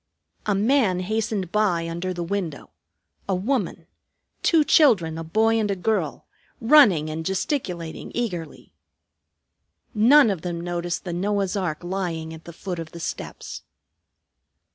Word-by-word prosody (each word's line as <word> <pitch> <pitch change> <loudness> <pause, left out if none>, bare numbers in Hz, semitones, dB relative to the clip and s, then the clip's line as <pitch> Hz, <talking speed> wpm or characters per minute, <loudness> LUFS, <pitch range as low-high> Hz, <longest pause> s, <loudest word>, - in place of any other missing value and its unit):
A 205 - +2
man 210 -3 +2
hastened 205 -2 -2
by 185 -6 +1
under 170 +3 -3
the 175 -1 -3
window; 175 -5 -4 0.6
a 190 - +2
woman; 195 -4 -2 0.6
two 325 -3 +4
children, 210 - +4
a - - -4
boy 220 +7 +2
and 210 -2 0
a 200 - 0
girl, 215 +4 -1 0.3
running 225 - +6
and 160 +1 -4
gesticulating 180 - -3
eagerly. 180 -10 -4 1.2
None 235 +3 +6
of 185 -5 -4
them 175 -1 -4
noticed 175 0 -3
the 175 - -4
Noah's 195 +2 -1
ark 175 -5 -2
lying 175 -3 -3
at 160 0 -12
the 170 - -8
foot 175 +1 -6
of 160 -1 -7
the 170 - -8
steps. - - -6
185 Hz, 140 wpm, -24 LUFS, 170-215 Hz, 1.2 s, running